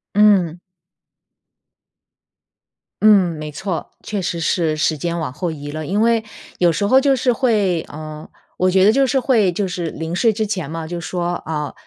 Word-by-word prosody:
嗯。 190 -5 +4 2.4
嗯， 195 -5 +5
没 155 0 -6
错， 180 +3 -4
确 205 -3 -3
实 170 -1 -3
是 160 -1 0
时 155 +1 +1
间 170 +3 -3
往 155 -6 -4
后 170 +5 -3
移 145 -2 -7
了。 155 0 -5
因 200 +4 0
为 230 -1 +3 0.4
有 175 -1 +4
时 165 +6 -1
候 260 +6 +5
就 275 -1 +3
是 250 -1 +1
会 210 - +1
呃， 155 0 -9 0.3
我 185 - +2
觉 190 +1 +4
得 210 - +6
就 270 +3 +3
是 265 +1 +2
会 225 -8 +2
就 195 +3 -2
是 175 -2 -3
临 160 +2 -5
睡 225 +3 +3
之 215 +1 -2
前 185 -8 -3
嘛， 165 0 -5
就 170 +1 -5
说， 175 0 -2
啊， 150 -3 -3
180 Hz, 190 characters per minute, -19 LUFS, 160-210 Hz, 2.4 s, 得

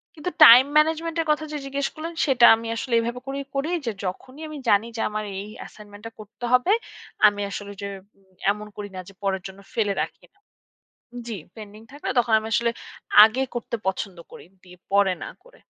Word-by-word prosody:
কিন্তু 360 +4 -4
time 250 +3 +10
management 325 +2 +1
এর 320 - -5
কথা 310 +1 0
যে 300 - -3
জিজ্ঞেস 275 0 -2
করলেন, 330 +2 -6
সেটা 255 -4 +5
আমি 225 0 -7
আসলে 235 +1 -4
এভাবে 240 +2 -3
করেই 275 0 -4
করি 280 +4 -1 0.2
যে, 230 - -1
যখনই 255 +11 -7
আমি 305 -1 -8
জানি 205 +3 +3
যে - - -2
আমার 215 0 -3 0.2
এই - - -10
অ্যাসাইনমেন্টটা 210 +1 -11
করতে 215 +3 -9
হবে, 250 +10 +4 0.6
আমি 205 0 -1
আসলে 205 0 -6
যে 200 - -4 0.6
এমন 210 +1 -7
করি 205 -1 -7
না - - -5
যে, 195 - -13
পরের 190 -1 -1
জন্য 190 +1 -13
ফেলে 210 -4 0
রাখি - - -6
না 400 - -35 0.9
জি, 220 -4 -4 0.2
পেন্ডিং 215 0 -11
থাকলে 290 -1 -6
তখন 230 -2 0
আমি 220 - -7
আসলে 235 +1 +2 0.5
আগে 225 +5 +3
করতে 235 0 -3
পছন্দ 190 -1 -3
করি। - - -12 0.2
দি 180 - -17 0.2
পরে 200 -2 +3
না - - -6
করে। - - -21
230 Hz, 190 wpm, -24 LUFS, 205-275 Hz, 0.9 s, time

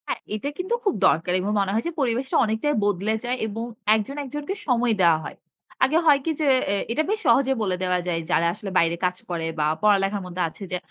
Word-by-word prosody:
হ্যাঁ, - - -2 0.2
এটা 245 +7 -3
কিন্তু 370 +5 -2
খুব 400 - +3
দরকার 170 +3 +1
এবং 195 +3 -2
মনে 195 -1 0
হয় 225 - 0
যে - - -2
পরিবেশটা 255 +1 -1
অনেকটাই 220 +7 0
বদলে 205 +2 0
যায় 250 +1 -1
এবং 225 +2 -5 0.3
একজন 220 +6 -3
একজনকে 295 +7 -5
সময় 245 -2 +2
দেওয়া 170 -2 +5
হয়। - - -8 0.5
আগে 275 +5 +3
হয় 290 -3 +6
কী 325 - +1
যে, 300 - +1 0.2
এ - - +1 0.2
এটা 305 +7 +1
বেশ 430 +1 0
সহজে 270 0 +4
বলে 190 -4 0
দেওয়া 180 0 +1
যায় 170 -2 0
যারা 170 -2 +3
আসলে 210 0 -7
বাইরে 170 0 +3
কাজ 180 0 -1
করে 170 -2 -2
বা 150 - +2 0.2
পড়ালেখার 200 -1 +3
মধ্যে 180 0 -5
আছে 195 - -12
যে 180 - 0
215 Hz, 220 wpm, -24 LUFS, 180-270 Hz, 0.5 s, হয়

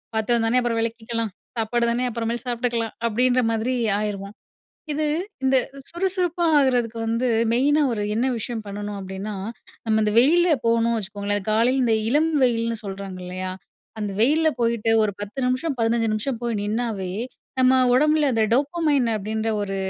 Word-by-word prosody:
பாத்திரம்தான 225 +2 +2
அப்புறம் 235 -2 0
விளக்கிக்கலாம். 230 -1 -3 0.3
சாப்பாடு 235 +2 0
தானே 245 +2 0
அப்புறமேல 230 0 -2
சாப்பிட்டுக்கலாம். 235 -2 -1
அப்டீன்ற 250 +3 +2
மாரி 225 +3 0 0.2
ஆயிருவோம். 205 0 -4 0.6
இது 305 +1 -1 0.4
இந்த 265 0 +4 0.3
சுறுசுறுப்பா 355 -1 -1
ஆகுறதுக்கு 245 -4 +1
வந்து 230 +3 0 0.3
மெயினா 285 +5 +3
ஒரு 210 - -2
என்ன 235 +4 +1
விஷயம் 225 0 -4
பண்ணணும் 205 0 -5
அப்படீனா, 190 +2 -6 0.5
நம்ம 220 0 +2
இந்த 210 0 +1
வெயில்ல 345 +7 +4 0.2
போணும்னு 230 0 +2
வச்சுக்கோங்களேன் 205 0 -2
காலையில 240 +5 +3
இந்த 225 -2 +3
இளம் 305 +5 +2
வெயிலுன்னு 230 -2 +1
சொல்றாங்க 195 -1 -6
இல்லையா? 185 +1 -4 0.5
அந்த 210 -2 -2
வெயில்ல 310 +7 +4
போயிட்டு 230 -1 +1
ஒரு 210 -1 +1
10 205 +5 -7
நிமிஷம், 255 +5 0
15 230 0 +1
நிமிஷம் 230 +4 -2
போய் 235 -1 -1
நின்னாவே 210 -2 -2 0.5
நம்ம 255 0 +5 0.2
உடம்பில 300 +3 +3
அந்த 225 -2 +2
டோப்பமைன் 285 -1 +2
அப்படின்ற 215 +2 -3
ஒரு 195 -1 -3
230 Hz, 145 wpm, -23 LUFS, 215-255 Hz, 0.6 s, நம்ம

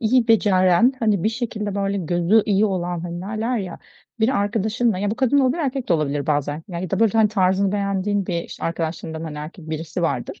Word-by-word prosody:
iyi 235 +1 +2
beceren, 205 +2 +4
hani 215 -7 +1
bir - - +4
şekilde 220 -4 -3
böyle 200 0 -1
gözü 175 +5 +2
iyi 205 0 +3
olan, 180 -3 -1
hani, 175 0 -5
derler 220 +4 -2
ya, 185 -4 -6 0.4
bir 220 - +4
arkadaşınla; 215 +1 0
ya 205 +1 -1
bu 220 - -1
kadın 260 +2 +2
olabilir, 265 +4 +2
erkek 270 -2 -2
de - - +3
olabilir 145 -3 0
bazen 145 +1 -1
ya 175 -1 -5
da - - -1
böyle 225 -3 +4
hani 215 -1 +5
tarzını 190 -1 +2
beğendiğin 200 -1 -1
bir, 170 -2 -1
işte, - - -8
arkadaşlarından, 165 -1 -3
hani, 150 -2 -6
erkek 160 +2 -9
birisi 160 +2 -4
vardır, 140 -7 -2
195 Hz, 200 wpm, -22 LUFS, 170-220 Hz, 0.4 s, hani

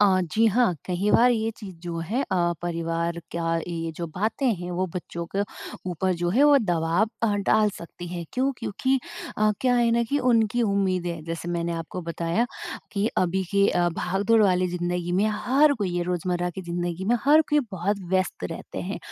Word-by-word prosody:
अ, 190 -2 +5
जी 225 - +4
हाँ, 225 -3 +3
कहीं 190 +3 0
बार 245 +1 +6
ये 225 -1 +1
चीज़ 195 -5 -9
जो 170 -1 -4
है 205 +11 -1
अ, 175 -7 +1
परिवार 170 0 -2 0.2
का 165 0 0
ये 165 -1 -3
जो 170 - -3
बातें 220 +7 0
हैं, 175 +1 -6
वो 185 +2 -1
बच्चों 170 -1 -5
के 200 - +1 0.5
ऊपर 185 +2 0
जो 175 - +1
है 255 +9 +3
वो 290 -1 +7
दबाव 175 0 +1
अ, 230 - +4 0.2
डाल 215 -1 +4
सकती 175 +1 -9
है 175 -1 -5
क्यों? 265 +1 +1
क्योंकि 260 +6 0 0.4
अ, 215 0 +4
क्या 250 -1 +3
है 235 -1 +3
ना 235 0 +3
कि 290 - +2
उनकी 235 -2 +2
उम्मीदें, 185 -5 0
जैसे 165 +1 -5
मैंने 170 0 -1
आपको 165 +2 -5
बताया 170 +7 -1 0.5
कि 205 +1 0
अभी 185 +1 +1
के 200 0 +4
अ, 175 0 +2
भागदौड़ 200 +5 +2
वाली 185 -2 +3
ज़िन्दगी 175 0 -2
में, 195 +4 +3 0.2
हर 285 +4 +5
कोई 195 -4 -1
ये 175 - +1
रोजमर्रा 180 0 -1
की 190 +2 -7
ज़िन्दगी 175 +1 -3
में, 240 +4 +3
हर 300 +3 +7
कोई 295 0 +4
बहुत 195 +3 -1
व्यस्त 185 - 0
रहते - - -6
हैं। - - -4
185 Hz, 195 wpm, -25 LUFS, 175-220 Hz, 0.5 s, वो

